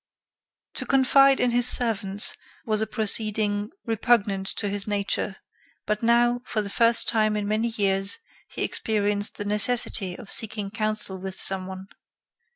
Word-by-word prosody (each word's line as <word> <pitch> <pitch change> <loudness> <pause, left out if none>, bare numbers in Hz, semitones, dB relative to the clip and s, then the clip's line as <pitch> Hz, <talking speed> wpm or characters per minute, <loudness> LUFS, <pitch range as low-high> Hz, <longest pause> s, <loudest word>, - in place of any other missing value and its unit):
To - - -3
confide 275 0 +4
in 245 - +1
his 245 +1 +1
servants 205 -5 -1 0.3
was 215 -1 0
a 220 - -2
proceeding 210 -1 +1 0.2
repugnant 215 -4 0
to 205 - -2
his 200 0 -3
nature; 200 -1 -3 0.5
but 210 0 -2
now, 240 +1 +2
for 215 -3 -3
the 200 - -5
first 230 +1 +4
time 215 -1 +1
in 205 -1 -3
many 215 +2 -1
years, 195 -3 +1 0.3
he - - -5
experienced 205 -1 0
the 205 - -6
necessity 210 -3 +3
of 205 - -9
seeking 210 -3 +1
counsel 215 -3 -2
with 190 0 -7
some 190 -1 +1
one. 190 0 -9
210 Hz, 150 wpm, -24 LUFS, 200-230 Hz, 0.5 s, confide